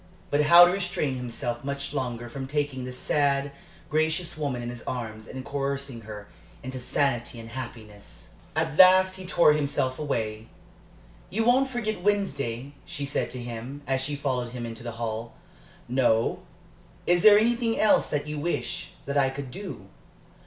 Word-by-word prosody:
But 145 Hz, -, +3 dB
how 170 Hz, +3 st, +10 dB
to 175 Hz, -, +2 dB
restrain 180 Hz, -7 st, -1 dB
himself 120 Hz, -1 st, -4 dB
much 140 Hz, +1 st, -4 dB
longer 120 Hz, -4 st, -3 dB
from 135 Hz, +2 st, -6 dB
taking 145 Hz, -3 st, -2 dB
the 125 Hz, -, -5 dB
sad, 140 Hz, +1 st, +1 dB, 0.4 s
gracious 160 Hz, +3 st, 0 dB
woman 140 Hz, -6 st, -2 dB
in 120 Hz, -, -4 dB
his 120 Hz, -1 st, -8 dB
arms 110 Hz, -3 st, -5 dB
and 130 Hz, 0 st, -7 dB
coercing 140 Hz, -3 st, -3 dB
her 105 Hz, -1 st, -9 dB, 0.4 s
into 130 Hz, +1 st, -5 dB
sanity 125 Hz, -2 st, -1 dB
and 115 Hz, 0 st, -9 dB
happiness! 115 Hz, -4 st, -9 dB, 0.2 s
At 160 Hz, -1 st, -1 dB
last 185 Hz, 0 st, +7 dB
he 185 Hz, -1 st, -7 dB
tore 170 Hz, -4 st, +5 dB
himself 140 Hz, -3 st, 0 dB
away. 110 Hz, -7 st, -2 dB, 0.8 s
"You 225 Hz, +4 st, 0 dB
won't 255 Hz, +3 st, +4 dB
forget 215 Hz, -6 st, -2 dB
Wednesday?" 145 Hz, -, -1 dB
she 145 Hz, -, -5 dB
said 140 Hz, -, -1 dB
to 125 Hz, -, -6 dB
him, 120 Hz, +4 st, -7 dB
as 135 Hz, -1 st, 0 dB
she 145 Hz, +2 st, -1 dB
followed 125 Hz, -4 st, -2 dB
him 120 Hz, -1 st, -4 dB
into 115 Hz, -1 st, -7 dB
the 120 Hz, -1 st, -5 dB
hall. 115 Hz, 0 st, -4 dB, 0.5 s
"No. 120 Hz, -3 st, +2 dB, 0.7 s
Is 175 Hz, 0 st, +3 dB
there 210 Hz, +1 st, +9 dB
anything 230 Hz, +1 st, +2 dB
else 215 Hz, -, +4 dB
that 145 Hz, 0 st, -1 dB
you 150 Hz, 0 st, -4 dB
wish 175 Hz, +3 st, -3 dB
that 140 Hz, +1 st, +1 dB
I 135 Hz, -1 st, +3 dB
could 135 Hz, -1 st, -6 dB
do?" 190 Hz, -, -7 dB
140 Hz, 165 wpm, -27 LUFS, 120-160 Hz, 0.8 s, how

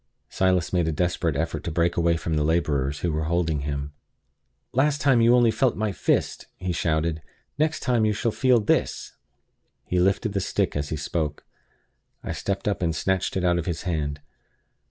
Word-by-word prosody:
Silas 95 Hz, -2 st, +1 dB
made 85 Hz, -3 st, +2 dB
a -, -, +1 dB
desperate 85 Hz, -1 st, 0 dB
effort 80 Hz, +3 st, -2 dB
to -, -, -3 dB
break 85 Hz, +1 st, +1 dB
away 85 Hz, -1 st, +2 dB
from 80 Hz, 0 st, -2 dB
the 75 Hz, -, +1 dB
laborers 75 Hz, -3 st, 0 dB
who 85 Hz, -, 0 dB
were 80 Hz, 0 st, -1 dB
holding 80 Hz, -2 st, 0 dB
him. 70 Hz, 0 st, -4 dB, 0.8 s
"Last 145 Hz, +3 st, +2 dB
time 135 Hz, -4 st, +4 dB
you 120 Hz, +2 st, +6 dB
only 120 Hz, -2 st, +4 dB
felt 130 Hz, +1 st, +1 dB
my 110 Hz, -1 st, -1 dB
fist!" -, -, -1 dB
he 90 Hz, 0 st, -3 dB
shouted 80 Hz, -1 st, 0 dB, 0.4 s
"Next 155 Hz, +1 st, +1 dB
time 120 Hz, -4 st, +1 dB
you 110 Hz, -, +3 dB
shall 115 Hz, +2 st, -1 dB
feel 125 Hz, +1 st, +3 dB
this!" 105 Hz, -, 0 dB, 0.7 s
He 90 Hz, -, 0 dB
lifted 95 Hz, +3 st, +1 dB
the 100 Hz, -, 0 dB
stick -, -, -1 dB
as 75 Hz, 0 st, -2 dB
he 80 Hz, -, -2 dB
spoke. 75 Hz, 0 st, -3 dB, 0.8 s
I -, -, -4 dB
stepped 100 Hz, +1 st, -3 dB
up 100 Hz, -, 0 dB
and 80 Hz, -2 st, 0 dB
snatched 95 Hz, +2 st, 0 dB
it 95 Hz, -, -1 dB
out 85 Hz, -1 st, +2 dB
of 85 Hz, -, -5 dB
his 85 Hz, -3 st, -3 dB
hand. 75 Hz, -5 st, -2 dB
85 Hz, 190 wpm, -25 LUFS, 80-100 Hz, 0.8 s, you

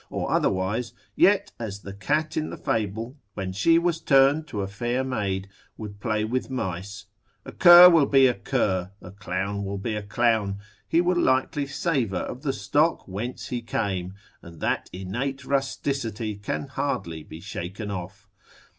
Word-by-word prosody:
or -, -, -3 dB
otherwise, 100 Hz, +6 st, 0 dB, 0.2 s
yet 200 Hz, 0 st, +4 dB
as 100 Hz, -4 st, -5 dB
the 95 Hz, -, -8 dB
cat 150 Hz, +11 st, -1 dB
in 155 Hz, -, -1 dB
the -, -, -7 dB
fable, 110 Hz, +3 st, -2 dB, 0.2 s
when 95 Hz, -1 st, -4 dB
she 165 Hz, -, +4 dB
was 170 Hz, -1 st, 0 dB
turned 140 Hz, +3 st, +4 dB
to 105 Hz, -8 st, -4 dB
a -, -, -3 dB
fair 120 Hz, +6 st, -2 dB
maid, 100 Hz, -7 st, -2 dB, 0.3 s
would 105 Hz, -2 st, -8 dB
play 110 Hz, 0 st, -1 dB
with 125 Hz, +4 st, -2 dB
mice; 100 Hz, -4 st, -4 dB, 0.4 s
a -, -, -8 dB
cur 175 Hz, 0 st, +10 dB
will 165 Hz, -6 st, +5 dB
be 135 Hz, -1 st, +5 dB
a 125 Hz, -, +4 dB
cur, 95 Hz, -3 st, -1 dB
a 90 Hz, -, -11 dB
clown 100 Hz, 0 st, -3 dB
will 100 Hz, 0 st, -4 dB
be 110 Hz, +3 st, -3 dB
a 105 Hz, -, -2 dB
clown, 105 Hz, -1 st, +1 dB, 0.3 s
he 165 Hz, -, +3 dB
will 175 Hz, 0 st, +1 dB
likely 130 Hz, +2 st, +1 dB
savour 140 Hz, -, -1 dB
of 125 Hz, -, -6 dB
the 145 Hz, -2 st, 0 dB
stock 150 Hz, +4 st, +1 dB
whence 105 Hz, +6 st, -5 dB
he 120 Hz, -1 st, -3 dB
came, 95 Hz, -5 st, -3 dB, 0.3 s
and 85 Hz, -1 st, -13 dB
that -, -, -1 dB
innate 125 Hz, +9 st, -4 dB
rusticity 135 Hz, -5 st, -2 dB
can 100 Hz, +7 st, -4 dB
hardly 130 Hz, -, -3 dB
be 80 Hz, +1 st, -11 dB
shaken 100 Hz, +3 st, -6 dB
off. 100 Hz, +2 st, -7 dB
110 Hz, 165 wpm, -25 LUFS, 100-135 Hz, 0.4 s, cur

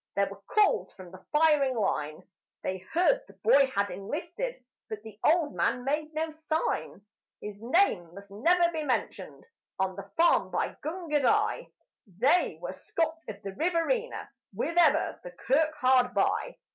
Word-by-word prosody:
There 200 Hz, 0 st, +1 dB
were 200 Hz, -, -11 dB
calls 425 Hz, -1 st, +2 dB
from 185 Hz, -2 st, -12 dB
the 185 Hz, 0 st, -13 dB
firing 300 Hz, -4 st, +3 dB
line; 155 Hz, -7 st, -2 dB, 0.4 s
They 185 Hz, 0 st, -2 dB
heard 355 Hz, -, +1 dB
the -, -, -16 dB
boy 280 Hz, -11 st, +5 dB
had 200 Hz, -6 st, -1 dB
enlisted, 330 Hz, -, -5 dB, 0.3 s
but 215 Hz, -1 st, -6 dB
the 220 Hz, -2 st, -12 dB
old 315 Hz, -2 st, +3 dB
man 245 Hz, -, 0 dB
made 300 Hz, +3 st, -1 dB
no 320 Hz, 0 st, -1 dB
sign. 315 Hz, -9 st, -3 dB, 0.3 s
His 210 Hz, 0 st, -8 dB
name 235 Hz, -, +2 dB
must 200 Hz, 0 st, -12 dB
never 340 Hz, -, +3 dB
be 320 Hz, -2 st, -3 dB
mentioned 200 Hz, -, -3 dB, 0.3 s
on 190 Hz, -1 st, -1 dB
the 200 Hz, -, -9 dB
farm 340 Hz, +1 st, +4 dB
by -, -, -1 dB
Gundagai 305 Hz, -4 st, 0 dB, 0.5 s
They 280 Hz, -, +3 dB
were -, -, -5 dB
Scots 330 Hz, -5 st, -3 dB
of 205 Hz, -1 st, -8 dB
the 195 Hz, -1 st, -6 dB
Riverina 360 Hz, -, -1 dB, 0.3 s
with 335 Hz, -, -2 dB
ever 345 Hz, -1 st, +3 dB
the -, -, -7 dB
kirk 310 Hz, -, 0 dB
hard 255 Hz, -2 st, +3 dB
by. -, -, 0 dB
285 Hz, 155 wpm, -28 LUFS, 200-335 Hz, 0.5 s, boy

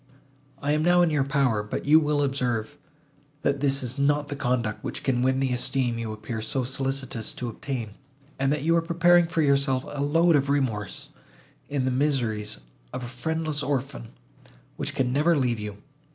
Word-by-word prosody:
I 145 Hz, -, +1 dB
am 150 Hz, +1 st, +2 dB
now 175 Hz, +2 st, +5 dB
in 170 Hz, -, +2 dB
your 145 Hz, -3 st, +2 dB
power; 135 Hz, -6 st, +1 dB
but 105 Hz, -, -5 dB
you 155 Hz, +2 st, +7 dB
will 150 Hz, -1 st, +1 dB
observe, 125 Hz, -5 st, -1 dB, 0.7 s
that 140 Hz, 0 st, +1 dB
this 135 Hz, -1 st, +2 dB
is 125 Hz, +3 st, -3 dB
not 145 Hz, +1 st, +2 dB
the 145 Hz, -, -3 dB
conduct 120 Hz, -5 st, -1 dB
which -, -, -5 dB
can 125 Hz, -3 st, +1 dB
win 130 Hz, +1 st, +2 dB
the 135 Hz, -1 st, 0 dB
esteem 125 Hz, -1 st, 0 dB
you 115 Hz, -1 st, -3 dB
appear 110 Hz, +1 st, -5 dB
so 125 Hz, +4 st, -1 dB
solicitous 135 Hz, -3 st, -3 dB
to 125 Hz, -, -4 dB
obtain, 115 Hz, -2 st, -5 dB, 0.5 s
and 135 Hz, 0 st, +2 dB
that 150 Hz, -2 st, -1 dB
you 165 Hz, +2 st, +3 dB
are 170 Hz, -, +3 dB
preparing 170 Hz, +1 st, +4 dB
for 165 Hz, -1 st, 0 dB
yourself 140 Hz, -2 st, +2 dB
a 145 Hz, -1 st, -5 dB
load 165 Hz, +4 st, +4 dB
of 140 Hz, -1 st, +1 dB
remorse, 115 Hz, -9 st, -1 dB, 0.6 s
in 140 Hz, -3 st, -1 dB
the 130 Hz, -, +1 dB
miseries 120 Hz, -, 0 dB, 0.3 s
of 130 Hz, -, -5 dB
a -, -, -5 dB
friendless 155 Hz, +4 st, -2 dB
orphan, 135 Hz, -3 st, -3 dB, 0.7 s
which -, -, -4 dB
can 125 Hz, -2 st, 0 dB
never 155 Hz, +4 st, +3 dB
leave 125 Hz, -4 st, +1 dB
you. 105 Hz, -1 st, -6 dB
135 Hz, 185 wpm, -26 LUFS, 120-145 Hz, 0.7 s, you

